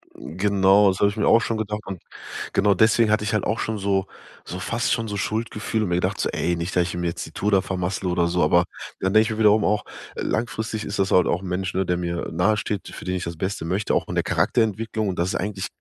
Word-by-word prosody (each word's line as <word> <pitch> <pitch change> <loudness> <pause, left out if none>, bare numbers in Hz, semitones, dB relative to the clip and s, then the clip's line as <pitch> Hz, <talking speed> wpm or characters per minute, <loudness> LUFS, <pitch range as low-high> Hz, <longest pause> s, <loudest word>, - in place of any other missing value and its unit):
Genau, 100 +2 +3
das 95 - -2
habe 100 - +4
ich 100 - -7
mir 105 - +1
auch 115 - +6
schon 115 - -1
gedacht. 105 0 -3
Und 95 -3 -7 0.5
genau 100 0 +4
deswegen 110 +2 +4
hatte 110 0 +2
ich 110 - -2
halt 105 - +1
auch 110 - -1
schon 110 -1 -2
so 95 -1 +1 0.4
so 90 - -6
fast 115 +6 -1
schon 115 -1 -1
so 105 -1 -4
Schuldgefühle 110 +1 -2
und 100 - -2
mir 85 - +1
gedacht 90 - -1
so: - - 0
„Ey, 85 +1 0
nicht, 85 +2 -4
dass 90 - +4
ich 85 - -4
ihm 90 0 -3
jetzt 85 -1 -3
die - - -11
Tour 105 - -1
da 95 -2 +4
vermassle 95 0 -3
oder 90 -1 +1
so“, 85 0 +1
aber 85 +3 +4 0.3
dann 95 +1 0
denk 110 0 +6
ich 110 - -2
mir 110 - -4
wiederum 105 -1 +5
auch: 105 +1 +1 0.3
„Äh, - - -5
langfristig 110 -2 -2
ist 100 - -4
das 95 - +1
halt 90 - +5
auch 90 - 0
'n 95 - -7
Mensch, 90 0 -2
ne, 95 0 0
der 90 0 0
mir 85 -1 -3
nahesteht, 105 +1 0
für - - -10
den 90 0 -1
ich 90 - -3
das 85 -1 -5
Beste 95 -1 -3
möchte, 95 +5 0
auch - - +1
von - - -5
der - - +1
Charakterentwicklung, 110 -2 0
und 95 - -4
das 85 +2 0
ist - - -2
eigentlich 100 -1 -3
100 Hz, 270 wpm, -23 LUFS, 90-110 Hz, 0.5 s, auch